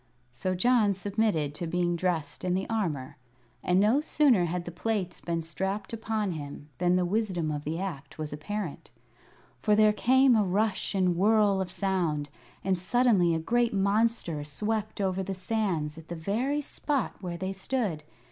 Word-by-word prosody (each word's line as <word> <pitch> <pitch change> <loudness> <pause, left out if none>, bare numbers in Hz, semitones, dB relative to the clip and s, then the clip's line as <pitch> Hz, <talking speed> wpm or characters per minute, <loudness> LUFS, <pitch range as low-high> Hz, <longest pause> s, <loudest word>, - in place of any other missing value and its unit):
So 185 +10 -2
John 215 0 +3
submitted 195 -7 0
to 170 +2 -4
being 175 +1 0
dressed 165 -4 -2
in 180 0 +1
the 190 - -2
armor, 160 -12 -2 0.4
and 180 +1 +2
no 220 +8 +4
sooner 275 - +3
had 175 +1 -3
the 175 - -5
plates 190 +1 -2
been 170 -1 -2
strapped 190 +6 -3
upon 220 -3 -1
him 145 -2 -7
than 180 0 +3
the 180 -1 +2
wisdom 185 -5 0
of 150 0 -4
the 155 +2 -2
act 150 -8 -6
was 155 -2 -4
apparent. 175 +3 -5 0.7
For 210 - +3
there 215 0 +5
came 260 +3 +4
a 215 - +4
rush 200 +2 0
and 180 -2 +2
whirl 205 +1 +3
of 185 - -3
sound, 170 -7 -1 0.3
and 185 -1 +1
suddenly 190 -4 +3
a - - 0
great 235 +6 +1
monster 200 -5 +1
swept 215 +9 -3
over 190 -1 0
the 190 0 -3
sands 185 -6 -1
at 160 - -14
the 175 - -5
very 235 - -1
spot 285 -3 -2
where 175 -2 -4
they 190 +2 -3
stood. 195 -5 -2
190 Hz, 170 wpm, -28 LUFS, 170-215 Hz, 0.7 s, there